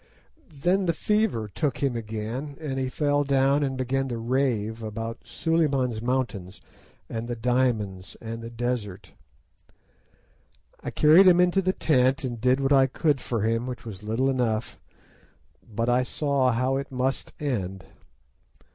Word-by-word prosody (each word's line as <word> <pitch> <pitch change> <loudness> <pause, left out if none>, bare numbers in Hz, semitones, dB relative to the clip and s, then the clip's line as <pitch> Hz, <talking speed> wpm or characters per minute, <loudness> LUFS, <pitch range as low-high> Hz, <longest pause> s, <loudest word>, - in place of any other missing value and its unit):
Then 175 +6 0
the 170 - +1
fever 210 - 0
took 140 - -2
him 135 -3 0
again, 115 +6 -5
and 140 -4 -3
he 130 -1 -1
fell 145 +1 +1
down 140 +1 +2
and 135 -2 -1
began 135 +1 -1
to 120 - -3
rave 115 -2 -1
about 115 +1 -5
Suliman's 140 -8 0
Mountains, 115 -7 -2 0.5
and 115 +1 -5
the 120 - -3
diamonds, 115 -6 -1
and 115 0 -6
the 115 - -7
desert. 115 -5 -4 1.7
I - - -5
carried 165 +6 +6
him 180 -1 +6
into 180 +2 +4
the 185 0 +1
tent 130 -5 +2
and 120 -4 -4
did 125 +2 +3
what 135 +1 +2
I 135 -1 +5
could 145 0 0
for 115 -4 -2
him, 115 +2 0
which 125 -2 -6
was 105 -5 -8
little 110 +5 0
enough; 120 -4 -1 0.9
but 115 +3 -1
I 125 +1 +3
saw 135 0 +1
how 130 +3 +1
it 140 0 -5
must 130 +1 -2
end. 95 - -3
125 Hz, 150 wpm, -26 LUFS, 115-140 Hz, 1.7 s, carried